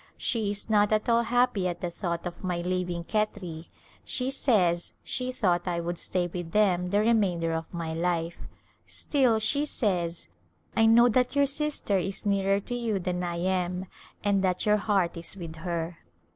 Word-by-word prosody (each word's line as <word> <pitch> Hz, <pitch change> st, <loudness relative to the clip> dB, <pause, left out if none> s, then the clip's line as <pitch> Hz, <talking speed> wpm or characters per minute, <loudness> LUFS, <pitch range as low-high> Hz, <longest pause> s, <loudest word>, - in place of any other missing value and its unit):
She 220 Hz, -4 st, 0 dB
is 205 Hz, 0 st, -3 dB
not 210 Hz, -1 st, +3 dB
at 215 Hz, 0 st, +1 dB
all 235 Hz, 0 st, +4 dB
happy 235 Hz, -5 st, +2 dB
at 175 Hz, -1 st, -4 dB
the 175 Hz, -, -2 dB
thought 170 Hz, -1 st, -3 dB
of 175 Hz, +1 st, -6 dB
my 180 Hz, -2 st, -1 dB
leaving 180 Hz, -1 st, -2 dB
Khetri; 180 Hz, -5 st, -2 dB, 0.4 s
she 255 Hz, 0 st, -1 dB
says 185 Hz, -11 st, +1 dB
she 255 Hz, 0 st, -2 dB
thought 180 Hz, -8 st, +1 dB
I 175 Hz, -1 st, 0 dB
would 170 Hz, 0 st, -3 dB
stay 180 Hz, -1 st, -1 dB
with 175 Hz, -1 st, -6 dB
them 180 Hz, -4 st, +3 dB
the 205 Hz, +2 st, +3 dB
remainder 190 Hz, -7 st, +2 dB
of 160 Hz, 0 st, -4 dB
my 165 Hz, -2 st, -4 dB
life, 170 Hz, 0 st, -1 dB, 0.5 s
still 255 Hz, -6 st, +2 dB
she 280 Hz, +6 st, +2 dB
says, 175 Hz, -, -1 dB, 0.2 s
" -, -, -35 dB
I 225 Hz, -1 st, +5 dB
know 235 Hz, +2 st, +7 dB
that 250 Hz, +3 st, +1 dB
your 285 Hz, 0 st, +5 dB
sister 280 Hz, -8 st, 0 dB
is 190 Hz, +4 st, -3 dB
nearer 195 Hz, 0 st, +2 dB
to 245 Hz, -, -5 dB
you 235 Hz, -4 st, -1 dB
than 180 Hz, -1 st, -2 dB
I 175 Hz, -1 st, -2 dB
am, 180 Hz, +1 st, -1 dB, 0.4 s
and 200 Hz, -1 st, +2 dB
that 180 Hz, -1 st, +1 dB
your 210 Hz, 0 st, +4 dB
heart 195 Hz, -5 st, +1 dB
is 170 Hz, +4 st, -7 dB
with 165 Hz, -3 st, -7 dB
her." 170 Hz, 0 st, -3 dB
185 Hz, 185 wpm, -28 LUFS, 175-220 Hz, 0.5 s, know